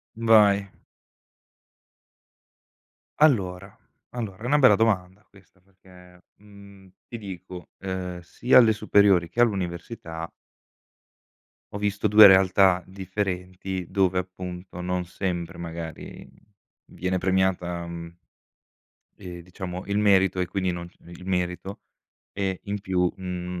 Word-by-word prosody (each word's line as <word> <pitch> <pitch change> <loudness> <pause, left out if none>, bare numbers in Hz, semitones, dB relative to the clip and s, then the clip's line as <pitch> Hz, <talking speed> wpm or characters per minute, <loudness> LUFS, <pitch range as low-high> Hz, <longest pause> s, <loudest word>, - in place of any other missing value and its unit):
Vai. 105 -4 +4 2.5
Allora, 100 -10 +1 0.3
allora, 110 -4 -6
è - - -5
una 145 +4 +3
bella 130 -7 +6
domanda 100 -3 0
questa, 95 -1 -22
perché, 90 -2 -20
mhmm, 100 -1 -16 0.2
ti 120 - -7
dico, 90 -3 -9
ehm, 95 -2 -5
sia 120 +8 +2
alle 115 -3 +6
superiori, 100 -5 +3
che 120 - 0
all'università 85 -5 -2 1.4
ho 100 - -3
visto 105 +1 -1
2 105 0 +10
realtà 95 -1 +4
differenti, 95 -1 -4
dove, 95 -1 +1
appunto, 90 -1 -7
non 90 0 -2
sempre, 90 -1 -4
magari, 85 -2 -8 0.5
viene 90 +1 -3
premiata, 90 -2 0
mhmm 85 0 -8 1.1
e, 90 -3 -9
diciamo, 90 +1 -7
il 100 +1 -2
merito, 95 -3 +3
e 90 - +1
quindi, 95 0 -1
non 85 0 -7 0.2
il 85 +1 -12
merito, 90 +1 -3 0.5
e, 95 -2 -3
in 100 0 -4
più, 90 -3 0
mhmm, 90 -1 -5
95 Hz, 110 wpm, -25 LUFS, 90-100 Hz, 2.5 s, 2